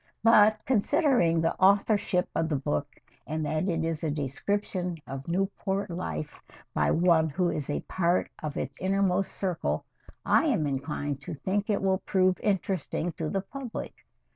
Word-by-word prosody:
"But 215 -1 +5
considering 245 - +3
the 165 - +1
authorship 200 -1 +3
of 165 0 0
the 155 - +1
book 145 +1 -2 0.3
and 155 0 -2
that 155 +5 0
it 165 -2 0
is 165 0 -2
a 160 - 0
description 175 +5 -2
of 135 0 -7
Newport 195 +2 -1
life 80 - -5 0.3
by - - +2
one 165 -2 +4
who 175 +4 0
is 150 -2 -3
a 145 - -1
part 175 -1 +1
of 150 -2 -4
its 135 - -5
innermost 195 0 +1
circle, 180 -4 -2 0.4
I - - +4
am 215 - +1
inclined 145 0 -3
to - - -6
think 200 +8 -2
it 200 -2 +1
will 190 -1 +2
prove 185 -2 +2
interesting 190 -4 -1
to 160 -1 -4
the 195 - -1
public. 255 +4 -6
180 Hz, 160 wpm, -28 LUFS, 155-200 Hz, 0.4 s, But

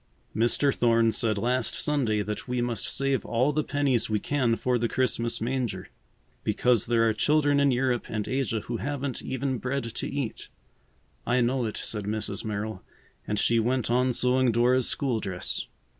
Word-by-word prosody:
"Mr. 120 +5 +2
Thorne 115 -1 +3
said 110 -2 0
last 125 +5 0
Sunday 120 -8 +1
that 105 +4 -5
we 125 0 -1
must 120 -1 -1
save 135 -1 +1
all 125 +5 +1
the 155 +1 +1
pennies 140 -6 0
we 105 -1 +1
can 125 -4 +1
for 125 +1 0
the 115 0 0
Christmas 120 -2 0
manger. 125 0 -2 0.5
Because 125 -4 +2
there 115 -1 +3
are 110 - +2
children 145 +4 +3
in 140 0 +4
Europe 125 -1 0
and 110 -2 -3
Asia 130 -4 -1
who 120 +2 -4
haven't 140 +1 -3
even 130 -1 -2
bread 135 +4 -2
to 115 -1 -4
eat." 140 -6 -4 0.7
"I 125 +1 +1
know 125 +1 +1
it," 110 - -4
said 105 -3 -4
Mrs. 105 -1 -3
Merrill, 105 -2 -4 0.5
and 105 - -1
she 115 +2 +3
went 120 +1 0
on 125 +1 +3
sewing 125 0 +2
Dora's 120 +2 +3
school 130 -5 0
dress. 95 -3 -4
120 Hz, 175 wpm, -27 LUFS, 115-130 Hz, 0.7 s, in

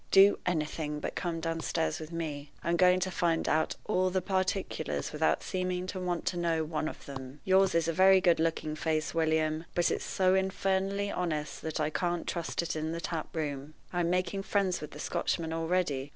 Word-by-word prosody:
Do 195 +1 +7
anything 150 -2 -1
but - - -4
come 170 -2 -2
downstairs 165 0 -1
with 155 +1 -8
me. 150 -4 -4
I'm 170 - +1
going 180 +1 +5
to 185 - 0
find 170 -2 +1
out 160 +1 +1
all 185 -3 +2
the 185 +1 +1
particulars 185 -4 -1
without 155 +1 +1
seeming 185 -1 -2
to 185 0 -4
want 180 -2 -2
to 180 - -1
know 165 -2 +1
one 155 0 -2
of - - -8
them. 135 0 -8
Yours 190 -1 +4
is 165 -1 +2
a 165 - +1
very 190 +2 +6
good 175 -3 +3
looking 160 -1 0
face, 155 0 -1
William, 160 0 +1
but 175 - +3
it's - - -1
so 185 -1 +2
infernally 195 +1 0
honest 155 -4 -2
that 160 0 -3
I 155 0 0
can't 175 +1 -1
trust 170 0 -2
it 165 - -3
in 155 +1 -2
the 170 - -3
tap 165 -2 -4
room. 145 -1 -3 0.2
I'm 175 -1 +1
making 185 +2 0
friends 195 -3 0
with 150 - -6
the 150 - -11
Scotchmen 160 +1 -1
already. 165 -5 0
170 Hz, 195 wpm, -30 LUFS, 155-185 Hz, 0.2 s, Do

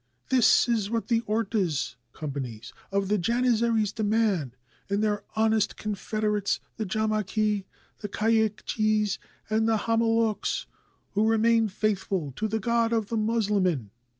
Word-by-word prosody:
This 255 -2 +5
is 220 -4 0
what 230 +1 -2
the 230 -1 +3
ortas 205 - 0 0.2
(companies) 130 -7 -6 0.2
of 195 0 0
the 210 +1 +1
Janizaries 230 0 +2
demand, 210 - 0 0.3
and 200 +1 +1
their 210 -1 0
honest 220 -1 +2
confederates, 210 -1 -1 0.2
the 220 - -3
Jamaki, 215 -1 0 0.3
the 205 - -5
Kayikjis, 215 -1 +1 0.3
and 220 +1 +1
the 225 - +3
Hama 230 0 +2
loks, 225 -2 0 0.5
who 210 +2 +2
remain 225 0 +3
faithful 190 -7 -1
to 220 - 0
the 220 +1 -1
God 235 +1 +1
of 220 -3 0
the 230 - -2
Moslemin." 205 - +1
215 Hz, 130 wpm, -27 LUFS, 200-225 Hz, 0.5 s, This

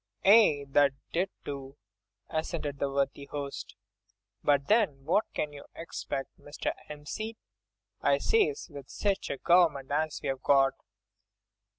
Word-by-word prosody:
"Aye! 195 -9 +6
that 140 0 +4 0.2
it 180 +3 +1 0.2
do," 140 0 -6 0.5
assented 155 -3 -3
the 140 - 0
worthy 140 0 -1
host, 140 -1 -6 0.7
"but 140 -1 +3
then 195 -12 +2
what 190 +7 +3
can 150 -1 -2
you 140 - -10
'xpect, 140 -4 -4
Mr. 145 - -4 0.2
'Empseed, 180 +10 -6 0.6
I - - +4
says, 445 -1 +1
with 140 -2 -10
sich 200 -2 -1
a 140 - -2
government 165 -5 +3
as 155 +1 0
we've 135 -1 -2
got?" 135 -1 +4
145 Hz, 125 wpm, -30 LUFS, 140-175 Hz, 0.7 s, Aye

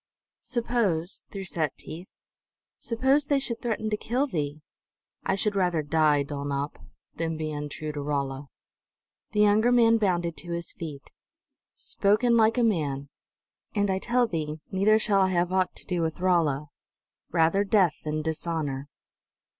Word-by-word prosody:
"Suppose," 225 -8 -1
through 195 -1 -6
set 155 -6 -1
teeth, 175 +4 -9 0.7
"suppose 265 +5 +2
They 285 - +3
should 260 -4 -2
threaten 220 -2 -2
to 210 - +1
kill 245 +6 0
thee?" 150 - -3 0.6
"I 190 - +1
should 205 +1 0
rather 180 -5 +1
die, 150 -1 +3
Dulnop, 140 0 -4 0.4
than 165 -1 -2
be 155 -1 -3
untrue 150 +1 -4
to 145 -1 -5
Rolla!" 140 -1 -2 0.9
The 210 - +3
younger 210 +3 +4
man 230 -2 +5
bounded 175 -5 0
to 175 -1 -5
his 170 0 -4
feet. 150 -4 -8 0.6
"Spoken 215 +4 +2
like 225 +1 +4
a 245 - +3
man! 145 -10 0 0.7
And 205 -1 +2
I 190 - 0
tell 245 +3 +2
thee, 155 -6 -3
neither 200 +3 +4
shall 205 -3 +2
I 190 - +3
have 175 0 +1
aught 185 -1 +1
to - - -8
do 180 -2 -1
with 160 0 -2
Rolla! 160 -6 +1 0.6
Rather 165 +4 +3
death 195 -5 +3
than 155 0 -2
dishonor!" 155 -4 -3
175 Hz, 150 wpm, -27 LUFS, 155-215 Hz, 0.9 s, man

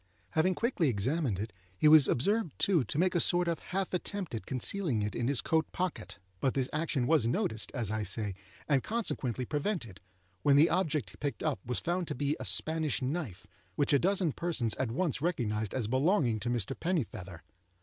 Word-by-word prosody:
Having 180 +4 +2
quickly 230 - +1
examined 125 - 0
it 105 +3 -5 0.2
he 155 - +4
was 150 -3 +8
observed, 200 - 0
too, 175 -8 +3
to 140 - -4
make 180 +3 +2
a 175 - +2
sort 175 +2 +2
of 170 -1 -1
half 190 +1 -3
attempt 185 -2 -3
at 115 - -5
concealing 130 - 0
it 105 - -2
in 120 - -1
his 140 -2 +2
coat 160 -1 0
pocket; 175 - -4 0.2
but 130 - 0
this 130 -2 +1
action 155 -5 0
was 150 -5 +3
noticed, 110 -2 -1
as 115 -5 0
I 110 0 -1
say, 105 +1 0 0.3
and 140 -3 +3
consequently 130 - -2
prevented, 145 - -3 0.4
when 140 +8 +4
the 150 +4 +6
object 155 - -1
picked 145 -1 -3
up 155 -4 0
was 125 0 -1
found 175 0 -1
to - - -3
be 145 +3 0
a - - -5
Spanish 160 -2 +1
knife 135 - -3 0.3
which 145 0 +2
a 140 - +5
dozen 185 -1 +2
persons 135 -9 0
at 130 - -1
once 140 +4 -1
recognized 110 - -1
as 125 -4 0
belonging 130 - +2
to 120 - -3
Mr. 120 +1 -1
Pennifeather. 105 - -3
145 Hz, 190 wpm, -31 LUFS, 115-170 Hz, 0.4 s, was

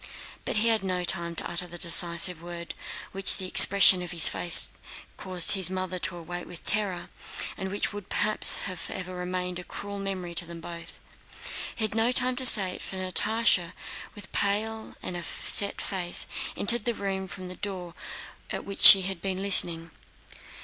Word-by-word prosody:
But - - -2
he 225 +2 +1
had 220 -3 0
no 185 -2 -3
time 170 -1 -3
to - - -3
utter 175 +1 -3
the 175 0 -9
decisive 170 0 +5
word 170 0 -9 0.4
which 195 0 -3
the 190 - -4
expression 190 0 +5
of 180 - -7
his 170 -2 +5
face 175 -1 +3 0.5
caused 185 -2 +3
his 190 -2 +4
mother 185 -1 -5
to 175 0 -4
await 175 +1 -9
with 175 -1 -13
terror, 200 -5 -4 0.5
and 190 - -7
which 205 +2 -4
would 205 -2 -10
perhaps 215 0 +2
have 185 -3 -6
forever 185 -1 -6
remained 180 0 -5
a - - -9
cruel 200 +2 -9
memory 190 -3 -6
to 175 +1 -2
them 170 0 -10
both. 170 0 -11 0.8
He 225 - -2
had 215 - -4
not 225 +3 0
time 255 0 +1
to 260 -1 +7
say 195 -5 +6
it, - - -10
for - - -8
Natásha, 185 0 0 0.4
with 205 -2 -10
a - - -21
pale 220 +2 -3
and 175 -1 -6
set 200 +3 -1
face, 180 -3 -2 0.3
entered 235 +1 +1
the 235 -1 -2
room 195 -1 -5
from 185 0 -10
the 180 - -9
door 185 -3 -7 0.6
at - - -6
which 200 - -8
she 195 -1 +10
had 190 -2 -6
been 190 -1 -4
listening. 170 -4 +2
185 Hz, 185 wpm, -25 LUFS, 175-200 Hz, 0.8 s, she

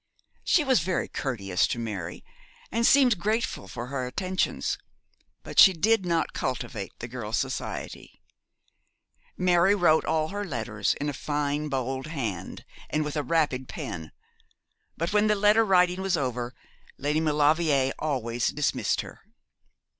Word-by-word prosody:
She 320 - +3
was 260 -5 +3
very 180 +3 -1
courteous 100 -9 -1
to - - -3
Mary, 100 -7 -5 0.5
and 230 +1 +2
seemed 255 -8 +5
grateful 220 +5 -1
for 120 -1 -6
her 130 -2 -3
attentions; 185 +8 -1 0.6
but - - -1
she 190 - +9
did 195 +2 +2
not 165 -1 0
cultivate 120 -6 -3
the 115 - -6
girl's 120 -2 -3
society. 130 -1 -5 1.2
Mary 180 +2 +4
wrote 170 -5 +4
all 155 0 0
her 205 +1 -4
letters 115 - -1
in 145 - -3
a 145 - -2
fine 145 +1 -2
bold 130 0 -2
hand, 115 - -5 0.2
and 155 0 0
with 150 - -4
a 150 - +1
rapid 145 -5 0
pen; 100 - -6 0.9
but 170 +4 -2
when 210 0 +4
the 210 - +3
letter 210 +2 +4
writing 180 -2 +3
was 190 -3 +1
over 125 -3 -3 0.4
Lady 150 +3 0
Maulevrier 150 -2 +2
always 120 -6 -1
dismissed 150 0 0
her. - - -12
150 Hz, 140 wpm, -27 LUFS, 125-180 Hz, 1.2 s, she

